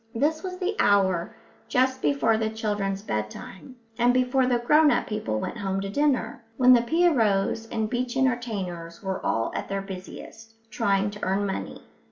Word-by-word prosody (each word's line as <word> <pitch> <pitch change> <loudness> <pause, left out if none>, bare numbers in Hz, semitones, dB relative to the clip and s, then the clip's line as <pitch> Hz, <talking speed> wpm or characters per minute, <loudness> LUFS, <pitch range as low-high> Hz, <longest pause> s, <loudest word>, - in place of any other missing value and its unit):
This 305 +6 +1
was 370 -1 -5
the 380 +3 -2
hour 190 - +2 0.3
just 260 +1 +1
before 275 -6 +2
the 220 0 0
children's 205 -3 -2
bedtime, 110 - -6 0.2
and 245 +1 +4
before 255 0 +2
the 245 -1 +2
grown 300 +6 +4
up - - +1
people 110 - -3
went 235 - -5
home 195 -1 -2
to 195 - -4
dinner 250 -2 0
when 255 -1 +7
the 240 - +5
pierrots 230 - +2
and 220 -1 -2
beach 245 +2 -2
entertainers 205 -10 -2
were 190 -1 -3
all 115 0 0
at - - -4
their 195 0 -2
busiest, 195 +3 -10 0.2
trying 200 -1 +1
to 210 - -11
earn 195 +2 0
money. 195 - -5
220 Hz, 170 wpm, -25 LUFS, 195-255 Hz, 0.3 s, when